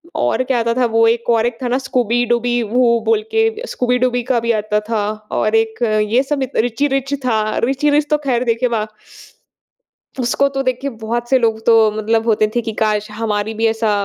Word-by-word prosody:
और 315 - 0
क्या 255 -2 +2
आता 230 0 0
था 255 0 +2
वो 225 0 +3
एक 235 +1 0
और 225 -1 +2
एक 240 -1 -2
था - - -1
ना 245 - +1
Scooby 250 -3 -1
Dooby 240 0 +1 0.2
वो 235 0 +3
बोल 445 -1 +2
के 445 - +3 0.3
Scooby 250 0 0
Dooby 245 -1 +1
का 255 -2 +2
भी 235 0 0
आता 210 0 -1
था 225 -2 0 0.4
और 215 +1 +1
एक 225 +1 0 0.3
ये 245 +3 +4
सब 280 0 -2 0.2
Richie 260 +5 -1
Rich 275 +1 -1
था। 225 -3 +1 0.2
Richie 275 +3 +1
Rich 295 0 +1
तो 300 - +3
खैर 250 -3 +1
देखे 230 +1 +1
वा 215 -1 -1 1.4
उसको 255 +3 +1
तो 270 - +1
देखिए 255 +2 -2
बहुत 235 +2 -3
से 265 - +5
लोग 225 -2 0
तो 230 - +6 0.2
मतलब 225 +1 0
होते 215 -1 +2
थे - - +3
कि 225 -1 -4
काश 210 0 0
हमारी 215 0 -2
भी - - +4
ऐसा 225 0 0
235 Hz, 210 wpm, -17 LUFS, 225-255 Hz, 1.4 s, तो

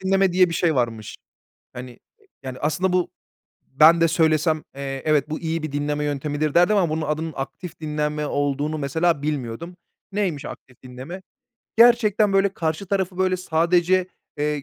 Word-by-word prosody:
dinleme" 190 -1 +2
diye 180 0 +4
bir 165 - -4
şey 165 -3 +1
varmış. 115 -4 -2 0.6
Hani, 125 +1 -8
e 120 - -16 0.4
yani, 130 -1 -7
aslında 180 +5 0
bu 180 -1 +1 0.7
Ben 165 +2 +7
de 165 - +4
söylesem, 155 -1 +1
eee, 135 -1 -5
"Evet, 150 -1 +2
bu 155 - -3
iyi 165 -1 -2
bir 155 - -5
dinleme 145 +1 -2
yöntemidir." 145 +1 -2
derdim 180 +5 +4
ama 180 -4 +2
bunun 155 0 -2
adının 155 +1 -2
"aktif 165 +6 -7
dinleme" 150 -1 -2
olduğunu 145 +2 -1
mesela, 160 +2 0
bilmiyordum. 150 +3 -4 0.4
Neymiş, 185 -8 -2
aktif 125 -2 -11
dinleme? 130 +9 -9 0.6
Gerçekten 220 -3 +5
böyle 195 0 +3
karşı 160 +3 -2
tarafı, 190 -1 -2
böyle, 185 0 +2
sadece, 180 +1 +1 0.3
eee, 150 -1 -1
155 Hz, 160 wpm, -22 LUFS, 145-180 Hz, 0.7 s, Ben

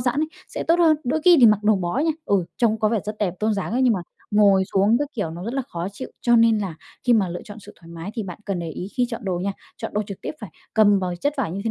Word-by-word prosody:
giãn 245 +4 0
ấy, 315 - 0 0.2
sẽ - - -4
tốt 335 +1 +4
hơn. 320 -3 +5
Đôi 305 +6 0
khi 350 -2 +8
thì 235 - +10
mặc 210 -1 +4
đồ 215 0 +4
bó 180 +6 -2
nha, 320 +2 +2
ừ, 195 -3 +1
trông 225 -3 +2
có 215 - +2
vẻ 225 0 +1
rất 210 +1 -5
đẹp, 185 -4 -1
tôn 215 0 +1
dáng 200 +2 -3
ấy, 255 +2 +1
nhưng 250 - +4
mà 195 - -1 0.3
ngồi 200 -2 +5
xuống 200 +4 +4
các 290 -1 -2
kiểu 205 -8 -2
nó 170 +3 -7
rất 230 +4 -4
là 270 - 0
khó 170 +2 -4
chịu. 255 +6 -7
Cho 240 -1 +4
nên 225 -1 +5
là 190 -6 -3 0.3
khi 245 - +4
mà 205 -5 +3
lựa 175 0 -6
chọn 210 +1 -10
sự 205 - -13
thoải 165 - -15
mái 170 +3 -7
thì 225 - -2
bạn 180 -3 -7
cần 195 -3 -2
để 165 -1 -4
ý 180 - -6
khi 250 - +2
chọn 230 0 -5
đồ 185 -2 -1
nha. 195 +2 -2 0.2
Chọn - - -6
đồ 210 - +1
trực 200 -2 -7
tiếp - - -3
phải 210 -6 -8 0.2
cầm 205 -2 +5
vào 180 -2 -3
chất 285 +1 +1
vải 240 -11 -1
như 195 - -4
thế 225 - 0
210 Hz, 320 wpm, -23 LUFS, 190-240 Hz, 0.3 s, thì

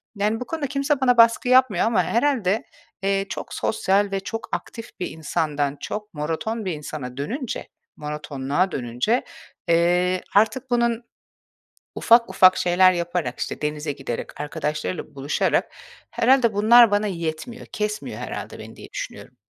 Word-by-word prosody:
Yani, 210 +2 0
bu 250 - -5
konuda 300 0 -3
kimse 280 +1 0
bana 250 -2 +4
baskı 230 +2 +5
yapmıyor 255 -8 +4
ama 230 - +2
herhâlde, 230 -5 +1 0.4
eee, 195 0 +1
çok - - -6
sosyal 200 -1 +1
ve 195 - 0
çok 225 +3 -6
aktif 230 -1 -9
bir 180 - -2
insandan 150 -3 -2
çok 210 0 -6
monoton 165 +9 -3
bir 185 - -1
insana 145 -4 -7
dönünce, 240 - -4 0.3
monotonluğa 150 +3 -2
dönünce, 125 - -1 0.4
eee, 175 +2 +2
artık 225 +5 +2
bunun 235 -1 +1 0.9
ufak 230 -3 +4
ufak 185 0 +6
şeyler 185 +1 +4
yaparak, 175 -1 -2
işte, - - -4
denize 150 0 -2
giderek, 135 -1 -6
arkadaşlarıyla 150 +2 -4
buluşarak 140 +2 0 0.4
herhâlde 245 -1 +3
bunlar 230 +2 +7
bana 205 +1 +1
yetmiyor, 170 +5 -5
kesmiyor 210 0 -4
herhâlde - - -6
beni - - -11
diye - - -11
düşünüyorum. - - -7
195 Hz, 140 wpm, -23 LUFS, 155-230 Hz, 0.9 s, bunlar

